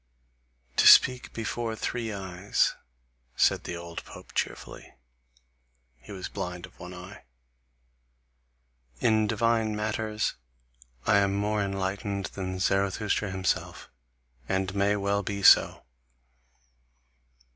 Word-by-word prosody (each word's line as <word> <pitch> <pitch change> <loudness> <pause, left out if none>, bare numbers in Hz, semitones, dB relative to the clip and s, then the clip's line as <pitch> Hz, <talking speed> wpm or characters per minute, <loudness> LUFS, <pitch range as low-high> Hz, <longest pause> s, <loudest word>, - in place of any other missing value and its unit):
"To - - +6
speak 125 -1 +7
before 115 0 -3
three 115 0 -3
eyes," 95 -1 0 0.6
said - - +2
the 85 - -4
old 85 0 -8
pope - - -13
cheerfully - - -5 1.0
(he - - -14
was 95 -2 -6
blind 90 -1 -5
of - - -20
one 90 - -9
eye), 90 +2 -11 1.8
"in 110 -2 +3
divine 115 0 +1
matters 110 0 -2 0.7
I 110 - +4
am 100 0 +2
more 105 +1 0
enlightened 100 0 -3
than 95 -1 -4
Zarathustra 100 +2 0
himself 95 -2 -3 0.6
and 95 0 -1
may 100 +1 +2
well 100 0 0
be 100 -1 -4
so. - - +6
100 Hz, 105 wpm, -27 LUFS, 95-105 Hz, 1.8 s, speak